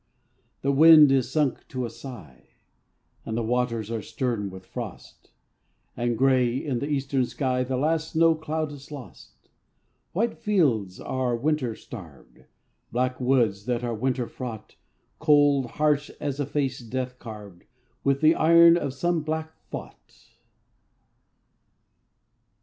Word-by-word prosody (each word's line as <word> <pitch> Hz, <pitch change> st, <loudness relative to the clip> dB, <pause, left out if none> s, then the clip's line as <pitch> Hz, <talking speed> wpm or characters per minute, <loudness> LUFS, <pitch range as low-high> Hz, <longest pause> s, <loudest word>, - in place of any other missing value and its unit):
The 140 Hz, -, +2 dB
wind 155 Hz, 0 st, +8 dB
is 130 Hz, -3 st, +2 dB
sunk 150 Hz, -3 st, 0 dB
to 130 Hz, -1 st, -3 dB
a -, -, -4 dB
sigh, 75 Hz, -, -11 dB, 0.8 s
And 110 Hz, -, -4 dB
the 115 Hz, -, 0 dB
waters 115 Hz, -2 st, -1 dB
are 115 Hz, -1 st, -2 dB
stern 115 Hz, -4 st, -3 dB
with 95 Hz, 0 st, -11 dB
frost; -, -, -9 dB, 0.7 s
And 120 Hz, -1 st, -1 dB
gray, 130 Hz, -2 st, +3 dB
in 135 Hz, -3 st, -2 dB
the 140 Hz, -, -3 dB
eastern 135 Hz, -2 st, 0 dB
sky, 130 Hz, -2 st, -1 dB
The 130 Hz, 0 st, -2 dB
last 160 Hz, +3 st, 0 dB
snow 165 Hz, 0 st, +5 dB
cloud 155 Hz, -1 st, -3 dB
is 140 Hz, 0 st, -12 dB
lost. 140 Hz, -4 st, -12 dB, 0.6 s
White 225 Hz, +6 st, -1 dB
fields, 140 Hz, -, +1 dB
that -, -, -11 dB
are 130 Hz, -2 st, -1 dB
winter 130 Hz, -2 st, -1 dB
starved, 85 Hz, -, -12 dB, 0.5 s
Black 125 Hz, +1 st, -1 dB
woods, 120 Hz, -6 st, +2 dB
that 125 Hz, -1 st, -1 dB
are 120 Hz, -1 st, -2 dB
winter 125 Hz, +2 st, -1 dB
fraught, 115 Hz, -4 st, -8 dB, 0.4 s
Cold, 145 Hz, -4 st, +4 dB
harsh 150 Hz, +3 st, 0 dB
as 145 Hz, -1 st, -3 dB
a 145 Hz, -, -1 dB
face 135 Hz, -3 st, -1 dB
death 125 Hz, +1 st, -5 dB
carved 105 Hz, -6 st, -10 dB, 0.4 s
With 140 Hz, 0 st, +1 dB
the 155 Hz, +1 st, +6 dB
iron 170 Hz, +1 st, +6 dB
of 140 Hz, -5 st, -3 dB
some 175 Hz, +3 st, 0 dB
black 160 Hz, +1 st, -4 dB, 0.2 s
thought. -, -, -10 dB
130 Hz, 140 wpm, -25 LUFS, 120-150 Hz, 0.8 s, wind